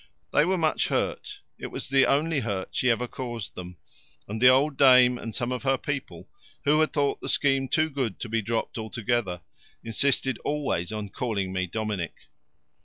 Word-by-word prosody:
They 150 Hz, -, +5 dB
were 185 Hz, +1 st, +1 dB
much 160 Hz, -2 st, +1 dB
hurt -, -, -2 dB, 0.2 s
it -, -, -5 dB
was -, -, -5 dB
the 135 Hz, 0 st, +4 dB
only 150 Hz, +2 st, +2 dB
hurt 100 Hz, -6 st, -3 dB
she 125 Hz, -, +1 dB
ever 120 Hz, +1 st, +1 dB
caused 120 Hz, -4 st, -6 dB
them 90 Hz, -1 st, -9 dB, 0.5 s
and 110 Hz, +2 st, -5 dB
the 125 Hz, -, +8 dB
old 135 Hz, +3 st, +3 dB
dame 125 Hz, -2 st, +6 dB
and 115 Hz, -2 st, -6 dB
some 120 Hz, +1 st, -1 dB
of 125 Hz, -, -2 dB
her 135 Hz, -1 st, +2 dB
people, 135 Hz, -12 st, -5 dB, 0.4 s
who 150 Hz, +2 st, +3 dB
had 155 Hz, -, +2 dB
thought 145 Hz, -2 st, 0 dB
the -, -, -4 dB
scheme 135 Hz, -1 st, +2 dB
too 155 Hz, +3 st, +2 dB
good 130 Hz, -8 st, -3 dB
to -, -, -3 dB
be 115 Hz, 0 st, 0 dB
dropped 115 Hz, +2 st, -2 dB
altogether, 110 Hz, -4 st, -2 dB, 0.4 s
insisted 130 Hz, +2 st, +1 dB
always 145 Hz, -, -2 dB
on 105 Hz, -2 st, -4 dB
calling 100 Hz, -5 st, -2 dB
me 95 Hz, -1 st, -1 dB
Dominic! 105 Hz, -4 st, -3 dB
125 Hz, 180 wpm, -26 LUFS, 110-140 Hz, 0.5 s, the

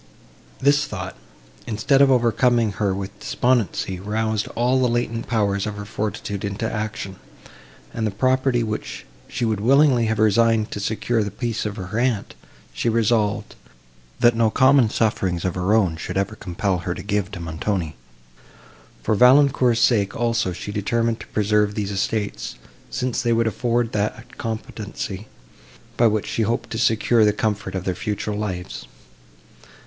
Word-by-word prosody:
This 145 Hz, +2 st, +3 dB
thought, -, -, -6 dB, 0.5 s
instead 115 Hz, +6 st, +2 dB
of 140 Hz, -, +6 dB
overcoming 120 Hz, -2 st, +3 dB
her 100 Hz, -3 st, +1 dB
with 100 Hz, +2 st, -5 dB
despondency, 115 Hz, -6 st, 0 dB
roused 110 Hz, +1 st, -1 dB
all 125 Hz, +3 st, +2 dB
the 125 Hz, -, +3 dB
latent 115 Hz, -1 st, -2 dB
powers 100 Hz, -3 st, 0 dB
of 105 Hz, -, -4 dB
her 105 Hz, 0 st, -7 dB
fortitude 105 Hz, -1 st, -4 dB
into 100 Hz, +2 st, -3 dB
action; 105 Hz, -3 st, -4 dB, 0.8 s
and 110 Hz, -1 st, -1 dB
the -, -, 0 dB
property, 130 Hz, +3 st, +1 dB
which 110 Hz, -1 st, -5 dB, 0.2 s
she 120 Hz, -, -2 dB
would 110 Hz, -3 st, 0 dB
willingly 130 Hz, 0 st, +4 dB
have 110 Hz, 0 st, 0 dB
resigned 110 Hz, +1 st, +3 dB
to -, -, -4 dB
secure 110 Hz, +3 st, 0 dB
the 100 Hz, -, -3 dB
peace 115 Hz, -1 st, -3 dB
of 105 Hz, -, -5 dB
her 100 Hz, +2 st, -4 dB
aunt, 120 Hz, -5 st, 0 dB, 0.4 s
she 120 Hz, -, 0 dB
resolved, 110 Hz, -2 st, +1 dB, 0.7 s
that 120 Hz, -1 st, +5 dB
no 115 Hz, -1 st, +3 dB
common 130 Hz, -1 st, +4 dB
sufferings 95 Hz, -6 st, 0 dB
of 90 Hz, -, 0 dB
her 90 Hz, +2 st, -1 dB
own 95 Hz, -7 st, +2 dB
should 85 Hz, -, -4 dB
ever 100 Hz, +3 st, -1 dB
compel 95 Hz, -1 st, -2 dB
her 85 Hz, +1 st, -3 dB
to -, -, -7 dB
give 100 Hz, -2 st, -1 dB
to 105 Hz, -, -8 dB
Montoni. 85 Hz, 0 st, -3 dB, 1.1 s
For -, -, +1 dB
Valancourt's 125 Hz, 0 st, +5 dB
sake 100 Hz, -5 st, +3 dB
also 115 Hz, -4 st, 0 dB
she 95 Hz, +3 st, -6 dB
determined 115 Hz, +2 st, 0 dB
to -, -, -10 dB
preserve 105 Hz, 0 st, +1 dB
these 105 Hz, -2 st, -2 dB
estates, 100 Hz, +1 st, -2 dB, 0.3 s
since 125 Hz, -1 st, -2 dB
they 120 Hz, -1 st, +2 dB
would 115 Hz, 0 st, +2 dB
afford 120 Hz, +1 st, 0 dB
that 110 Hz, +2 st, -3 dB
competency, 110 Hz, -2 st, -5 dB, 0.7 s
by 120 Hz, -, +4 dB
which 110 Hz, -1 st, 0 dB
she -, -, -2 dB
hoped 115 Hz, +2 st, -1 dB
to 110 Hz, -, -3 dB
secure 115 Hz, 0 st, +3 dB
the 105 Hz, -, +5 dB
comfort 105 Hz, -2 st, -2 dB
of 95 Hz, -, -2 dB
their 95 Hz, -, -1 dB
future 105 Hz, +2 st, -3 dB
lives. 95 Hz, -4 st, -5 dB
110 Hz, 160 wpm, -22 LUFS, 100-120 Hz, 1.1 s, of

